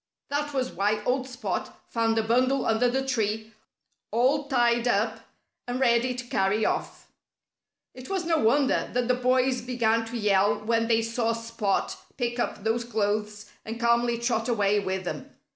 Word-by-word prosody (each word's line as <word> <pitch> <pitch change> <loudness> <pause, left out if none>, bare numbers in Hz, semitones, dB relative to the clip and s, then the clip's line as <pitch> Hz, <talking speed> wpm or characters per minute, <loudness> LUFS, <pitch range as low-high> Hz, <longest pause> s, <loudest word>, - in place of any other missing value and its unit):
That 290 +1 -1
was 260 -2 -1
why 210 +1 0
old 260 +2 0
Spot 250 +1 -4
found 225 -1 0
a 225 - +2
bundle 255 +4 +2
under 225 +2 +2
the 265 +2 -1
tree, 220 -3 -2 0.6
all 270 +5 +2
tied 240 -3 +2
up 220 0 +1 0.5
and 245 +1 -2
ready 250 0 +2
to 250 0 -6
carry 205 -1 +1
off. - - -3 0.8
It 255 0 -11
was 380 -3 -1
no 325 -1 +2
wonder 265 +4 +2
that 245 -1 0
the 250 - +3
boys 255 0 +1
began 230 -2 +1
to 235 +1 -5
yell 205 -2 +3
when 230 0 +1
they 225 -1 +2
saw 230 0 0
Spot 230 -3 -2 0.2
pick 240 -2 -2
up 210 - -2
those 225 +2 0
clothes 210 -2 -2
and 225 +1 -6
calmly 235 0 +2
trot 235 -1 -1
away 205 -3 +2
with 190 -1 -3
them. 180 - -6
235 Hz, 165 wpm, -26 LUFS, 220-250 Hz, 0.8 s, the